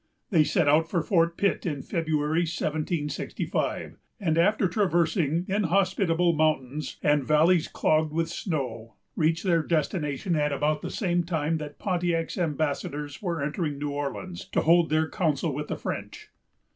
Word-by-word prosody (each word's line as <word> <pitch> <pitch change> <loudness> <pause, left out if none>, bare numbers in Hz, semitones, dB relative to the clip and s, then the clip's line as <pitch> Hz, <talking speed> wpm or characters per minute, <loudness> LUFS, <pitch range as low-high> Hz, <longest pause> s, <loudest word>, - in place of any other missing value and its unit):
They 165 -5 +5
set 155 +1 +1
out 160 +3 +4
for 170 -3 0
Fort 170 -3 +2
Pitt 200 - +1
in 145 -6 -3
February, 155 -1 0
1765; 155 -2 -2 0.2
and 165 -6 +1
after 190 +4 +3
traversing 170 -3 +1
inhospitable 185 -3 +2
mountains, 155 -2 -1
and 145 -1 +3
valleys 160 +4 +3
clogged 155 0 +1
with 165 +1 0
snow, 125 - -4 0.2
reached 160 +1 +1
their 170 -4 +3
destination 155 0 -1
at 150 -1 +1
about 150 +2 0
the - - -4
same 175 -4 0
time 160 -2 -1
that 150 -1 -7
Pontiac's 175 -3 -1
ambassadors 150 -2 -2
were 170 -7 -2
entering 150 0 -2
New 145 0 -3
Orleans, 145 +6 -5
to - - +3
hold 170 0 +4
their 155 +1 +2
council 155 -3 0
with 150 +2 -4
the - - -3
French. - - -6
160 Hz, 145 wpm, -27 LUFS, 150-175 Hz, 0.2 s, They